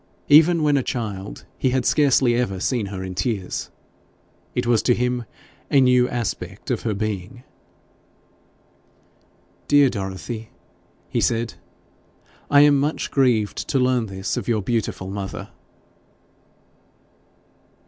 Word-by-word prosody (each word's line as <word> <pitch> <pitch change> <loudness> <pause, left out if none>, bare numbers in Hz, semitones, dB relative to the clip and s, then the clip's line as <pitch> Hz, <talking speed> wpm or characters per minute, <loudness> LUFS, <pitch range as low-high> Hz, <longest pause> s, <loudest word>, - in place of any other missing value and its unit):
Even 160 +2 +6
when 145 -1 +3
a - - +2
child, 105 -6 -5
he 130 - +2
had 130 0 0
scarcely 135 -4 +3
ever 120 -6 -1
seen 110 +1 -1
her 95 -1 -6
in 95 0 -5
tears; 95 +1 -3 0.9
it - - 0
was 120 -2 +3
to 120 - +2
him 125 0 -1 0.4
a 140 - +4
new 125 -1 +4
aspect 105 -1 -4
of 120 - -1
her 110 -3 -2
being. 110 +3 -4 2.2
'Dear 145 -3 +5
Dorothy!' 105 +3 -5 0.6
he - - -1
said, 115 0 0 1.0
'I 145 0 +6
am 145 0 +6
very 150 +2 +1
much - - -5
grieved 120 -7 +1
to - - +1
learn 125 -3 +2
this 95 -1 -4
of - - -4
your 110 -4 0
beautiful 105 -4 -2
mother.' 100 -1 -6
120 Hz, 130 wpm, -22 LUFS, 100-130 Hz, 2.2 s, Even